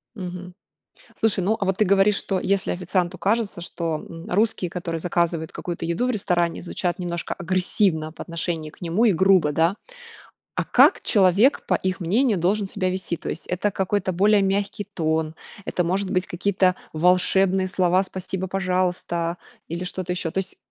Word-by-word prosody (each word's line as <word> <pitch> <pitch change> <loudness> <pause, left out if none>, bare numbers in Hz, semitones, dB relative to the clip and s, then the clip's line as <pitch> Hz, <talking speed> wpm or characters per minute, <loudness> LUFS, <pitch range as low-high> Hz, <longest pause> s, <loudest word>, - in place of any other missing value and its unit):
Мгм. 180 -2 -7 0.7
Слушай, 215 -4 +2
ну, 215 +4 +2
а - - +1
вот 190 -1 0
ты 215 - +4
говоришь, 200 +1 +4
что 195 -1 -1
если 195 0 0
официанту 180 0 -1
кажется, 210 -3 0
что, 165 -2 -3
м, 165 0 -9
русские, 200 -2 +1
которые 170 -2 -4
заказывают 170 -2 -1
какую-то 170 -1 -5
еду 170 +9 0
в 255 - +1
ресторане, 175 -7 0
звучат 175 0 -2
немножко 175 -1 -3
агрессивно 180 -2 0
по - - -8
отношению 165 -2 -4
к - - -20
нему 175 +6 +1
и 220 - +5
грубо, 185 -3 +4
да? 165 +6 +2 0.8
А - - -1
как - - +5
человек 205 +5 +3
по - - +2
их 185 0 -2
мнению 210 +5 +2
должен 195 +4 +1
себя 185 -1 -1
вести? 185 -1 -2
То - - -6
есть 165 - -5
это 190 +3 0
какой-то 190 0 -1
более 205 +3 +4
мягкий 200 +1 -1
тон, 160 -5 -2 0.3
это 180 - -1
может 185 +3 -1
быть 185 0 0
какие-то 185 0 +1 0.2
волшебные 185 +3 +3
слова 185 -1 +2
"спасибо, 190 0 -5
пожалуйста" 180 -2 -1 0.3
или 170 +2 -3
что-то 180 0 -4
ещё. 180 -2 -2
То 190 - -1
есть 190 - -4
185 Hz, 170 wpm, -23 LUFS, 170-195 Hz, 0.8 s, и